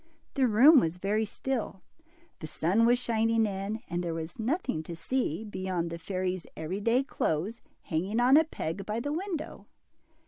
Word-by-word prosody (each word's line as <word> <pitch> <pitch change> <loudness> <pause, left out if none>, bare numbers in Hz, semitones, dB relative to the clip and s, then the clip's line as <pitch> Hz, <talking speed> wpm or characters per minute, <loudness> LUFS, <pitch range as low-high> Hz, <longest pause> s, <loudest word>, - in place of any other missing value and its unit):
The 265 -3 +3
room 260 +8 +7
was 165 -4 -1
very 210 +4 0
still, 225 -3 -4 0.6
the 155 - -6
sun 195 +9 +2
was 245 +1 +5
shining 225 -2 +1
in, 200 +2 -3
and 175 +1 -2
there 170 -2 -2
was 165 +3 -6
nothing 255 - -1
to 165 +2 -7
see, 180 - -2
beyond 185 -5 -3
the 170 - -5
fairy's 185 0 -3
every 160 +5 -3
day 235 +5 +3
clothes 205 - -2 0.2
hanging 190 +7 -1
on 250 +3 +6
a 315 - +7
peg 195 - -5
by 215 +3 -3
the 290 +5 -3
window. 340 -2 -5
210 Hz, 170 wpm, -29 LUFS, 175-245 Hz, 0.6 s, room